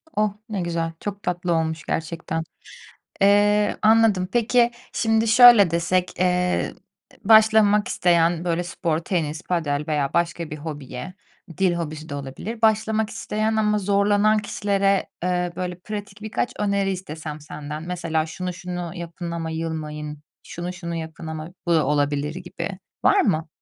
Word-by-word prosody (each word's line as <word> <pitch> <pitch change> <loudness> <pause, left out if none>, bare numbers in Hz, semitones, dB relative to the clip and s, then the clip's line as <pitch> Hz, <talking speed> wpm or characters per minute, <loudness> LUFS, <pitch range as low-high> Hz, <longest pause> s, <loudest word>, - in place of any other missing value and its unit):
Oh, 210 -1 +1 0.2
ne 200 -4 -2
güzel. 165 -1 -2
Çok 200 -1 -6
tatlı 175 0 -1
olmuş 160 0 -1
gerçekten. 165 0 -3 0.8
Eee, 205 +1 +4
anladım. 215 -4 +4
Peki, 240 0 +3 0.2
şimdi 225 0 +1
şöyle 230 -5 +8
desek, 175 +2 0
eee, 180 0 +1 0.5
başlamak 220 0 +5
isteyen 170 -3 +2
böyle 175 0 0
spor, 170 -2 -1
tenis, 165 -2 -2
padel 150 -5 -1
veya 145 -3 0
başka 170 -1 0
bir 155 - -5
hobiye, 145 +1 -7 0.4
dil 185 -2 +3
hobisi 155 -2 -5
de 145 - -5
olabilir. 145 - -6
Başlamak 220 0 +2
isteyen 220 0 -1
ama 210 -1 +2
zorlanan 205 +2 +3
kişilere, 200 -1 0 0.2
eee, 180 -1 0
böyle 180 -1 -4
pratik 205 +1 -7
birkaç 220 +3 -2
öneri 200 -1 +1
istesem 160 -4 -6
senden, 150 +1 -7
mesela 165 -2 -2
"Şunu, 180 +3 -5
şunu 175 -1 -6
yapın 170 -1 -6
ama 165 -1 -3
yılmayın."; 155 -2 -4 0.2
"Şunu, 175 +1 -6
şunu 170 -2 -6
yapın 160 0 -6
ama 160 0 -5 0.2
bu 170 - +2
da 155 -4 +3
olabilir." 145 +1 0
gibi, 180 +1 -6 0.3
var 405 - +5
mı? 160 - +1
180 Hz, 140 wpm, -23 LUFS, 160-205 Hz, 0.8 s, şöyle